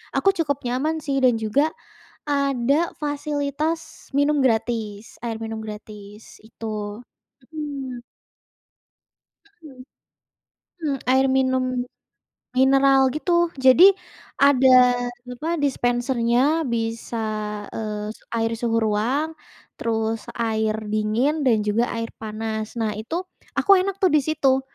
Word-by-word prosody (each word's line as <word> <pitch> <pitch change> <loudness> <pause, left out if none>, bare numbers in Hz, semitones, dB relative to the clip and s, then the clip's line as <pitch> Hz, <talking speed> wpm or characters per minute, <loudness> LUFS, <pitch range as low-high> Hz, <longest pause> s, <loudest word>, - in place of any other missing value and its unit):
aku 390 - +3
cukup 285 -5 0
nyaman 300 +6 -1
sih 275 -1 0
dan 250 -1 +6
juga 280 +9 +1 0.5
ada 280 +2 +1
fasilitas 295 +2 -3
minum 290 +1 +3
gratis, 225 -4 -1
air 230 -2 -3
minum 225 0 -5
gratis, 210 -1 -10
itu, 215 0 -6 0.5
mhm. 275 -5 -5 1.4
Mhm, 315 -10 -15 1.0
mmm, 290 -4 -1
air 265 +1 +4
minum 260 -1 +2 0.9
mineral 270 +1 +5
gitu. 345 +2 +1
Jadi, 275 +9 +7 0.5
ada 255 -3 +5 0.2
apa, 305 +7 -3
dispensernya 250 +2 +1
bisa, 230 -1 -3 0.5
eee, 210 -1 -4 0.2
air 225 0 0
suhu 230 -1 0
ruang, 230 +9 0 0.5
terus 225 -1 -2
air 220 -2 0 0.2
dingin 235 +8 0
dan 220 -4 +3
juga 215 +3 +1
air 230 0 -3
panas. 220 0 -4
Nah 225 -2 -1
itu, 320 +11 -3 0.3
aku 400 - 0
enak 390 +1 -2
tuh 375 - +5
di 305 - +5
situ, 270 -3 +2
255 Hz, 105 wpm, -23 LUFS, 225-290 Hz, 1.4 s, Jadi